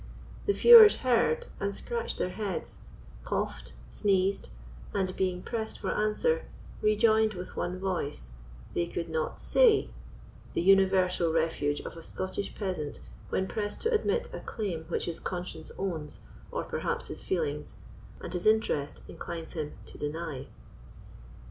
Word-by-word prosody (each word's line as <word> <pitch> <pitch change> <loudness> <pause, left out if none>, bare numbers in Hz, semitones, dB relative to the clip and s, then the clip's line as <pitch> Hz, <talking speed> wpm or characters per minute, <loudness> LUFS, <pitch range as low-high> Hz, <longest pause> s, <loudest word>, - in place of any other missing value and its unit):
The 405 - +4
feuars 455 -2 +10
heard 230 -11 +3
and 200 0 -1
scratched 470 - -3
their 180 - -1
heads, 200 -3 -4 0.4
coughed, 60 - -3 0.2
sneezed, 195 -1 +1 0.5
and 185 -1 0
being 180 -1 -1
pressed 220 -2 -3
for - - -2
answer, 475 - +1 0.4
rejoined 215 0 +4
with 180 0 -7
one 180 +1 -2
voice, 170 - -3 0.4
"They 170 - 0
could 170 0 -4
not 160 -1 -2
say"—the 480 -4 +4 0.7
universal 185 -2 +4
refuge 160 -3 0
of - - -8
a - - -8
Scottish 190 +4 -4
peasant 180 -8 -3 0.3
when 190 - 0
pressed 205 0 -3
to 460 - +1
admit 460 +2 +1
a - - -4
claim 185 -8 -4
which - - -1
his 170 - -4
conscience 175 -3 -5
owns, 165 -6 -4 0.3
or - - -2
perhaps - - -2
his - - -6
feelings, 150 -5 -2 0.5
and - - -6
his 180 +3 0
interest 215 -10 +1
inclines 165 -1 -6
him 155 -3 -4
to - - -12
deny. 150 -3 -4
185 Hz, 135 wpm, -29 LUFS, 165-215 Hz, 0.7 s, feuars